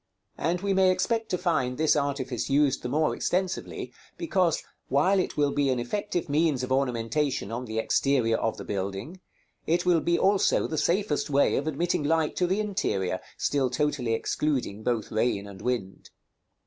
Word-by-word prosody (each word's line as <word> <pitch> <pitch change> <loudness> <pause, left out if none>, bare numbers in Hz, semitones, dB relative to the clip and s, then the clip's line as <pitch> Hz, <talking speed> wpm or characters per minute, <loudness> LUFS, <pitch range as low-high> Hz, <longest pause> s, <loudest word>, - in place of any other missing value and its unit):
And 175 +2 0
we 200 0 0
may 190 -1 +4
expect 225 +5 0
to 180 - 0
find 155 -9 0
this 155 0 +3
artifice 140 -4 -2
used 140 -1 +2
the 125 - -4
more 155 +4 +1
extensively, 185 +1 -2 0.2
because, 190 - +1 0.2
while 180 +9 +3
it 185 - -2
will 145 -1 +2
be 145 -1 +1
an 130 - +1
effective 175 +8 -2
means 145 -3 +1
of 125 - -4
ornamentation 130 -1 0
on 120 +2 -4
the 110 -1 -5
exterior 115 0 +2
of 115 - -1
the - - -7
building, 100 - -4 0.5
it 170 +3 +1
will 175 -3 +4
be 170 +2 +2
also 195 0 +3
the 155 - -2
safest 175 -5 0
way 140 0 +3
of 145 - -1
admitting 170 +3 0
light 160 +1 +1
to 180 - +2
the 190 +3 0
interior, 185 - -1 0.2
still 135 -3 +1
totally 135 -4 0
excluding 125 -5 -1
both 115 -2 -1
rain 110 -2 0
and 100 -1 -11
wind. 115 -6 -3
145 Hz, 175 wpm, -27 LUFS, 125-175 Hz, 0.5 s, may